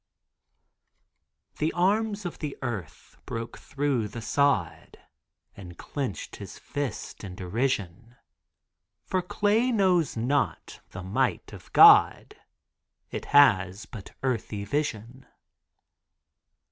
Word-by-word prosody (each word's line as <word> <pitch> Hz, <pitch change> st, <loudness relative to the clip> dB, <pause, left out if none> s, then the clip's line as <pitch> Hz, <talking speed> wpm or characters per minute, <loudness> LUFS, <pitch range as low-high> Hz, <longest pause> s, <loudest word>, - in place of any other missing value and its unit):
The 155 Hz, +1 st, +1 dB
arms 205 Hz, +3 st, 0 dB
of 175 Hz, -, -6 dB
the 150 Hz, -3 st, -5 dB
earth 105 Hz, -, -6 dB
broke 115 Hz, 0 st, -6 dB
through 135 Hz, -6 st, -1 dB
the 110 Hz, +3 st, -8 dB
sod 140 Hz, -, 0 dB, 0.6 s
And 90 Hz, -3 st, -11 dB
clenched 135 Hz, -9 st, -5 dB
his -, -, -9 dB
fist 145 Hz, -7 st, -5 dB
in 95 Hz, -2 st, -7 dB
derision, 105 Hz, +2 st, -3 dB, 0.9 s
For 185 Hz, -, 0 dB
clay 210 Hz, +7 st, +1 dB
knows 185 Hz, -, +2 dB
not 135 Hz, +5 st, -1 dB
the 90 Hz, -, -8 dB
might 95 Hz, +2 st, -1 dB
of -, -, -13 dB
God, -, -, +6 dB, 0.8 s
It -, -, -5 dB
has 100 Hz, -9 st, +4 dB
but 110 Hz, -7 st, -11 dB
earthy 110 Hz, -5 st, -2 dB
vision. 130 Hz, -1 st, -4 dB
130 Hz, 100 wpm, -27 LUFS, 105-150 Hz, 0.9 s, God